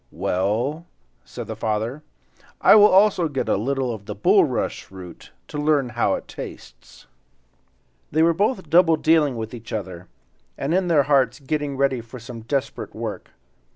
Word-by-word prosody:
"Well," 120 - -2 0.4
said - - -8
the - - -6
father, 110 +6 -2 0.6
"I - - +6
will 210 -1 +8
also 190 -3 +4
get 140 -4 -3
a - - +2
little 130 +3 -1
of 105 -2 -10
the 105 - -5
bulrush 105 - +1
root, 90 -2 -12 0.2
to 150 - -5
learn 145 -4 +1
how 120 0 0
it - - -8
tastes." - - -11 1.1
They 160 +2 +3
were 170 0 +4
both 195 0 -1
double 165 +1 +5
dealing 155 -4 +2
with 110 +1 -6
each 115 -1 -10
other, 95 -4 -6 0.5
and 140 +4 -2
in 185 0 +1
their 155 -5 +4
hearts 135 -2 +2
getting 145 -1 -3
ready 135 -3 +1
for 115 +3 -11
some 115 0 -9
desperate 130 +4 -4
work. - - -6
135 Hz, 160 wpm, -22 LUFS, 115-155 Hz, 1.1 s, will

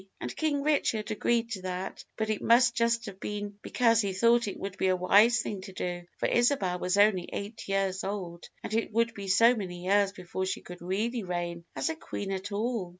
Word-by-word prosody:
"And - - -5
King 290 -3 0
Richard 230 -8 +1
agreed 230 +1 0
to 195 -5 -4
that; 185 +1 -5
but 220 0 0
it 215 - -2
must 235 0 +5
just 230 0 +1
have 195 -3 -8
been 205 0 -5
because 230 -2 +3
he 200 -2 -2
thought 235 +4 +3
it 200 - -5
would 195 -1 -5
be - - +2
a 185 - +3
wise 210 +6 +5
thing 200 -3 -4
to 190 0 -10
do, 175 -1 -4
for - - -2
Isabel 240 -8 +2
was 180 +2 0
only 205 -4 +4
eight 205 +2 -6
years 195 -1 0
old, 180 -4 -5
and - - -5
it 225 0 0
would 230 +1 +1
be 200 -1 -7
so 230 +6 +6
many 180 -4 -6
years 200 +1 +3
before 185 0 -4
she - - -3
could 180 0 -11
really 215 +7 -1
reign 175 -2 -4
as - - -1
a 320 - -2
queen 205 -10 -5
at 190 +1 -4
all. 215 -2 -2
200 Hz, 215 wpm, -29 LUFS, 185-230 Hz, -, so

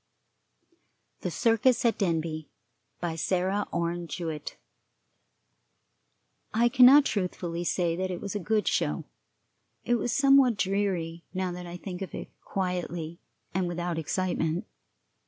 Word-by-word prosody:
THE - - -3
CIRCUS 230 - +3
AT 230 - +2
DENBY. 160 -4 -1 0.5
BY 170 -2 -2
SARAH 190 +4 0
ORNE 170 0 -2
JEWETT. 160 -2 -5 2.0
I 235 +2 +4
cannot 260 +4 +8
truthfully 175 -3 -2
say 175 -1 +1
that 185 +1 -2
it 180 -2 -3
was 200 - -5
a 205 - -2
good 210 +3 0
show; - - 0 0.8
it 240 0 +2
was 245 - -1
somewhat 275 -4 +5
dreary, 185 -4 -1
now 185 -1 -1
that 180 0 -7
I 175 +1 -7
think 180 0 -7
of 195 - -5
it - - -6
quietly 175 -3 -3 0.3
and 185 0 0
without 175 -1 -2
excitement. 175 +1 -1
180 Hz, 125 wpm, -28 LUFS, 170-205 Hz, 2.0 s, cannot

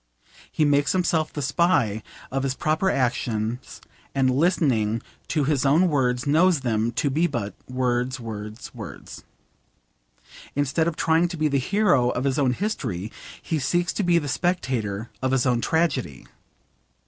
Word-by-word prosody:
He 155 - +2
makes 145 0 +3
himself 170 -4 +1
the 145 - -4
spy 145 - +2 0.3
of 135 +1 -1
his 135 -1 -1
proper 155 +7 +1
actions, 120 - -2 0.3
and 130 -1 +3
listening 130 - +2 0.2
to 150 - 0
his 140 -2 +1
own 155 +6 +4
words 125 -4 +1
knows 160 +2 +3
them 115 -2 0
to 140 +4 0
be 160 +5 +2
but 105 -9 -3 0.2
'words, 125 0 -1
words, 110 -1 -7
words.' 105 - -9 1.3
Instead 145 +3 +1
of 170 - -1
trying 165 +2 +2
to 175 0 -6
be 155 0 +2
the 140 -1 +1
hero 140 - +2
of 125 - -2
his 140 +1 0
own 130 -3 +2
history, 120 - -3 0.3
he 160 - -2
seeks 175 +6 0
to - - -1
be 175 -3 +3
the 150 -3 -1
spectator 120 - -1
of 130 - +1
his 135 -1 +2
own 125 -2 +2
tragedy. 150 - 0
135 Hz, 155 wpm, -24 LUFS, 120-160 Hz, 1.3 s, own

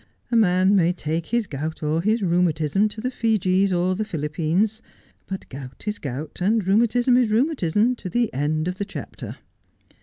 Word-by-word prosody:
A - - +2
man 190 -2 +4
may 175 -2 +3
take 160 -1 -3
his 235 -2 0
gout 155 0 -5
or 155 +2 +1
his 215 +3 +1
rheumatism 175 +2 +2
to 215 - -9
the 255 +2 -2
Fijis 195 -5 +1
or 180 +1 +1
the 205 +4 -1
Philippines: 170 +5 -1 0.5
but 190 -1 -6
gout 130 -1 -9
is 210 - -2
gout 140 +2 -6
and 210 +2 +2
rheumatism 235 +5 +3
is 245 -3 +3
rheumatism 230 - +2
to 185 - -6
the 235 +2 0
end 155 +4 0
of 180 +1 -4
the 200 - -1
chapter.' - - -8
185 Hz, 175 wpm, -23 LUFS, 160-220 Hz, 0.5 s, man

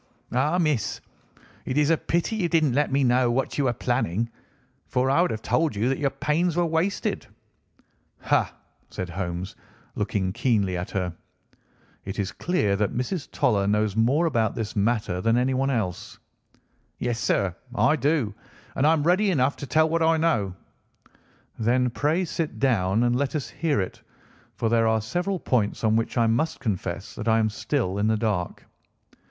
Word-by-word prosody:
Ah, 145 +8 +1
miss, 150 - 0 0.6
it 130 - -3
is 150 +1 +3
a - - +5
pity 170 +7 -1
you 180 -5 0
didn't 155 -6 +2
let 145 +2 +1
me 135 +1 +2
know 125 0 +3
what 130 +4 -1
you 140 - +2
were 120 - +2
planning, 115 -2 -1 0.6
for 130 +1 +1
I 140 - +4
would 180 - +2
have 110 0 -4
told 160 -7 +1
you 110 +5 +1
that 135 - -1
your 140 - +1
pains 165 +5 0
were 175 - +3
wasted." 165 +5 -1 0.9
"Ha!" - - +1 0.4
said 90 -1 -5
Holmes, 90 +1 -4 0.4
looking 100 -3 -1
keenly 100 -7 +1
at 90 +4 -4
her. 90 -5 -2 0.9
"It 95 0 -6
is 100 -2 -2
clear 105 - 0
that 105 0 -1
Mrs. 140 +6 -3
Toller 100 -4 +1
knows 105 -1 +1
more 130 +9 +3
about 115 -9 +1
this 110 -4 -4
matter 105 -3 0
than 115 +2 +2
anyone 130 +2 +1
else." 110 -9 -3 0.8
"Yes, 120 -1 -2
sir, 95 -6 0 0.2
I 155 - +4
do, 140 -6 0 0.4
and 140 - +3
I 160 - +6
am 155 -3 +1
ready 185 +5 +3
enough 140 -5 +2
to 140 - -7
tell 160 +2 +3
what 165 +1 0
I 165 0 +4
know." 110 - +1 1.0
"Then, 125 +2 +2
pray, 155 +9 0
sit 165 -1 -3
down, 110 -5 +2
and 120 0 +2
let 140 +3 -1
us 145 - -3
hear 155 -7 0
it 95 - -4 0.5
for 115 - -1
there 115 0 +3
are 110 0 +3
several 175 - -2
points 115 -8 0
on 110 0 +3
which 115 +2 -1
I 115 - +4
must 120 +9 0
confess 100 -6 -3
that 110 - -6
I 110 0 +4
am 110 -1 +1
still 105 -5 -1
in 105 - +2
the 110 0 +2
dark." 105 -5 -2
120 Hz, 180 wpm, -25 LUFS, 105-150 Hz, 1.0 s, I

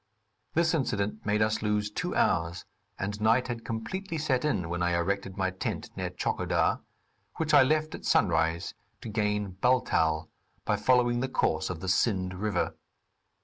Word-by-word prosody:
This 170 0 +3
incident 110 -8 -1
made 105 +1 +3
us 110 0 0
lose 105 -1 0
two 180 +11 -3
hours, 85 0 +1 0.3
and 100 +2 -4
night 115 +4 +3
had 115 -1 -4
completely 165 - -4
set 135 -5 0
in 100 - 0
when 85 +1 -3
I 85 0 +2
erected 100 +2 -1
my 95 -1 0
tent 95 - -4
near - - -3
Tchokodar, - - 0 0.6
which - - -1
I - - +9
left 155 +3 +2
at - - -8
sunrise 80 -3 +2 0.3
to - - -6
gain 105 -3 -1
Baltal, 80 -11 +2 0.4
by - - +2
following 120 -1 +3
the 130 +1 -1
course 80 -10 0
of 85 -3 -5
the 95 - -5
Sind 95 -1 +1
river. 100 0 -1
105 Hz, 160 wpm, -29 LUFS, 90-125 Hz, 0.6 s, I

